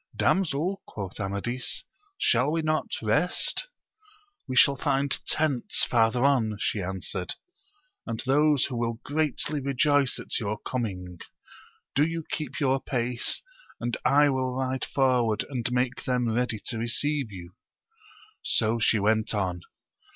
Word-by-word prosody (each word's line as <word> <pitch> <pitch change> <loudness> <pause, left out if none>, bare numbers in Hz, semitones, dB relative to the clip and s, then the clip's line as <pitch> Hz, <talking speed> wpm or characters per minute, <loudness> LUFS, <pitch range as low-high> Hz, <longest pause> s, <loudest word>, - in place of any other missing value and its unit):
Damsel, 185 +1 +1
quoth 100 -2 -7
Amadis, 100 +6 -2 0.3
shall 125 - +3
we 160 +1 0
not 155 0 0 0.2
rest? 150 - +2 0.8
We 130 - -3
shall 140 +2 +6
find 140 0 0 0.2
tent» 145 -6 0 0.2
farth^ 115 -1 +3
on, 120 -5 +2
she 105 - 0
answered, 90 -1 -4 0.7
and 115 -2 -3
those 145 +1 +4
who 125 - -4
will 115 0 -1
greatly 150 0 0
rejoice 140 0 +2
at - - -3
your 105 -1 -2
coming; 90 -9 -4 0.7
do 145 - +4
you 165 +1 -1
keep 150 -4 -3
your 135 -2 +2
pace, 120 -2 -1 0.4
and 120 0 -2
I 145 0 +5
will 130 -1 -1
ride 130 0 -1
forward 125 -5 +2
and 120 -2 -2
make 125 +1 0
them 125 -2 +1
ready 120 -2 0
to 115 -3 -3
receive 135 +2 -1
you. 90 -2 -10 0.9
So 115 +1 +1
she 110 0 +3
went 110 +2 +1
on. 90 -4 -1
125 Hz, 135 wpm, -27 LUFS, 110-140 Hz, 0.9 s, shall